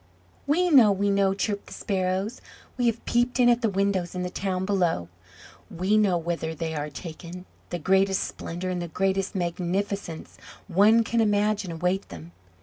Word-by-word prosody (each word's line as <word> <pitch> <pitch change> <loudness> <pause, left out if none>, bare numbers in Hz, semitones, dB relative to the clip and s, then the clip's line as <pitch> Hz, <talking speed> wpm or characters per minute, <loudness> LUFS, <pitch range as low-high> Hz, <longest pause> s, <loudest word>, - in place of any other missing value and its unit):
"We 350 +5 +2
know! 245 -8 +7
we 200 +1 +1
know!" 195 -1 +2
chirped 200 0 -2
the - - -10
Sparrows. 190 +3 -2 0.3
"We 245 -2 +1
have 230 0 -1
peeped 240 +2 +1
in 245 -1 +6
at 240 0 +3
the 225 - +2
windows 195 -3 -1
in 180 - -2
the 180 - -4
town 190 -1 -2
below! 175 - 0 0.6
We 190 +2 0
know 205 -4 +3
whither 165 -1 -3
they 160 0 -3
are 150 -1 -3
taken! 170 +3 -9 0.2
The 175 - -3
greatest 190 +3 +2
splendour 180 +2 -5
and 180 -1 -2
the 175 - -4
greatest 195 +3 -1
magnificence 180 0 -3 0.3
one 210 +5 +5
can 230 +1 0
imagine 205 -2 +1
await 180 +4 -1
them. 85 -1 -10
190 Hz, 170 wpm, -26 LUFS, 175-205 Hz, 0.6 s, know